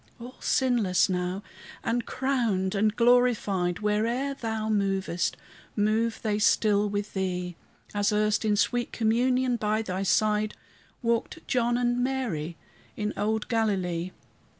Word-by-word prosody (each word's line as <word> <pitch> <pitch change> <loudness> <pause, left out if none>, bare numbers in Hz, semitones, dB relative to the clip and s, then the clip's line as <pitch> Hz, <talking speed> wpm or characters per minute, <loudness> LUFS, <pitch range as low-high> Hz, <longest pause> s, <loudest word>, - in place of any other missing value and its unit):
All 245 +2 -10
sinless 230 -10 +2
now, 180 +2 -2 0.4
and 235 0 -1
crowned 235 -8 0
and 210 +1 +1
glorified, 230 -7 +2
Where'er 230 +6 0
thou 220 -4 -3
movest 195 -4 0 0.4
move 220 +2 +1
they 210 -2 0
still 210 0 +3
with 205 +1 -3
thee, 180 -2 -2 0.4
As 205 0 +1
erst, 210 +1 +1
in 210 -1 +2
sweet 240 +3 0
communion 245 +2 +1
by 215 0 0
thy 185 -2 -3
side, 210 +2 +1 0.5
Walked 235 +7 -1
John 240 -1 +1
and 245 0 +1
Mary 210 - -2 0.4
in 210 0 -2
old 215 +1 -1
Galilee. 185 -7 0
215 Hz, 125 wpm, -27 LUFS, 195-240 Hz, 0.5 s, still